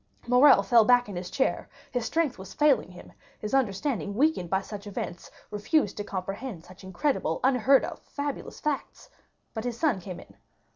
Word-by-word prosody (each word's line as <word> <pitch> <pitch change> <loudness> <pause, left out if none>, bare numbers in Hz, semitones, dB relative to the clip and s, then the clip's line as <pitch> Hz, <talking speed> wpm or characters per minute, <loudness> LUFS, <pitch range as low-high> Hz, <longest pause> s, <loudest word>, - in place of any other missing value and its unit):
Morrel 250 -3 +6
fell 230 +3 +5
back 245 +1 +4
in 200 - -7
his 180 0 -5
chair, 265 - -1 0.2
his 245 -3 -2
strength 315 - 0
was 190 0 -10
failing 295 -9 +3
him; 180 - -13 0.3
his 210 - -6
understanding 225 -3 0
weakened 275 - +1
by 190 - +2
such 205 +1 -8
events, 180 -3 -6 0.2
refused 210 - +1
to 205 - -3
comprehend 195 0 -5
such 185 +2 -15
incredible, 190 - -1
unheard 265 +1 +4
of, - - -7
fabulous 285 -1 -6
facts. 295 -2 -4 0.4
But 220 - -4
his 245 -1 -4
son 285 - +1
came 180 0 -7
in. - - -15
225 Hz, 175 wpm, -27 LUFS, 195-270 Hz, 0.4 s, Morrel